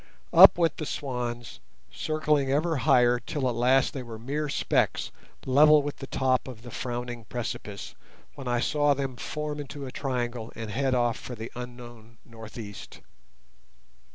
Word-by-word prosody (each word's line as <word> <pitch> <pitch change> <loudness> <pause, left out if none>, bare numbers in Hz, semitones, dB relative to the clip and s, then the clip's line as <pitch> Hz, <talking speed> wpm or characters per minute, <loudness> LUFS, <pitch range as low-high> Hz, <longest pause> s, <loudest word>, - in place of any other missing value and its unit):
Up - - +10
went 165 -3 +1
the 155 - -4
swans, 120 -3 -4 0.3
circling 150 -3 0
ever 160 +3 +1
higher 125 0 +4
till 130 +3 -2
at 125 - 0
last 125 +3 +3
they 135 - -4
were 115 -2 -8
mere 145 +6 -3
specks - - 0 0.3
level 150 +3 +6
with 145 0 -4
the 135 - -8
top 130 -1 +1
of 120 -3 -9
the 120 - -9
frowning 120 -1 -5
precipice, 105 -4 -5 0.4
when 135 -3 -8
I 120 -1 +1
saw 145 +1 +2
them 135 -2 -3
form 150 +3 -4
into 145 0 -6
a 130 - -7
triangle 120 -4 -3
and 110 -2 -6
head 130 +3 +1
off 120 -2 +1
for 125 - -7
the 110 +1 -7
unknown 120 -2 -10
north 110 -1 -11
east. 100 -4 -9
125 Hz, 160 wpm, -27 LUFS, 120-140 Hz, 0.4 s, Up